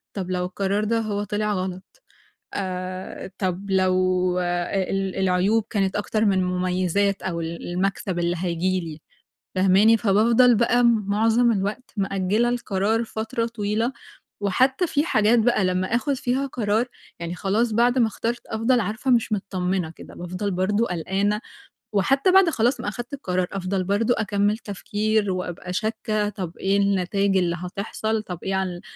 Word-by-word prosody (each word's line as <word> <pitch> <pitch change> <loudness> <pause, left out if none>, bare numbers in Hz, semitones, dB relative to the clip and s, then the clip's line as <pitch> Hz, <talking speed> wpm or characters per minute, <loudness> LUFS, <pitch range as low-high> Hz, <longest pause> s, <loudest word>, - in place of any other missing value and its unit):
"طَب، 185 -2 -3
لو 180 0 0
القرار 195 +3 -1
ده 230 +1 +1
هو 205 -2 -2
طلع 210 +1 -1
غلط؟ 185 0 -5 0.5
آآ، 185 0 -5
طَب، 190 +1 -2
لو 185 -1 +2
ال 185 +2 -1
العيوب 190 +4 +2
كانت 195 -3 0
أكتر 215 +2 0
من 195 -2 +3
المميزات، 185 +2 0
أو 170 -2 -2
المكسب 175 +2 -2
اللي 175 0 0
هييجي 185 +1 0
لي؟" 160 -2 -7 0.6
فاهماني؟ 195 +4 +5
فبافضل 230 +4 +4
بقى، 240 +2 +3
معظم 225 +2 +3
الوقت، 205 +5 -3
مأجِّلة 195 +4 +1
القرار 225 -1 0
فترة 225 +2 -3
طويلة. 225 +2 -1 0.5
وحتى 260 - +2
في 290 0 +1
حاجات 220 -5 +3
بقى، 225 -3 +2
لمّا 185 +3 0
آخد 280 +3 0
فيها 260 +1 -1
قرار، 225 -2 0 0.3
يعني 170 +1 -4
خلاص، 215 +5 0
بعد 240 +3 +3
ما 230 - +5
اخترت، 230 +3 -4
أفضل 230 +3 +1
عارفة 220 +6 -2
مش 230 -2 +2
مطمِّنة 185 -4 -1
كده. - - -12
بافضل 180 +3 -4
برضه 205 +5 +1
قلقانة، 195 +5 -1 0.5
وحتى 270 - +3
بعد 380 -2 +6
خلاص 245 -1 +1
ما - - -5
أخدت 240 +5 -5
القرار، 185 -9 -1
أفضل 190 0 -1
برضه 205 +6 +1
أكمِّل 205 0 +1
تفكير، 210 0 -1
وأبقى 180 0 -4
شاكَّة، 215 0 -1
طَب، 185 -5 -6
إيه 195 +1 +1
النتايج 200 0 +1
اللي 175 -2 +1
هتحصل؟ 215 +4 -3
طَب، 180 -4 -7
إيه 190 0 -1
عن 190 0 0
ال - - -12
200 Hz, 150 wpm, -24 LUFS, 185-225 Hz, 0.6 s, بعد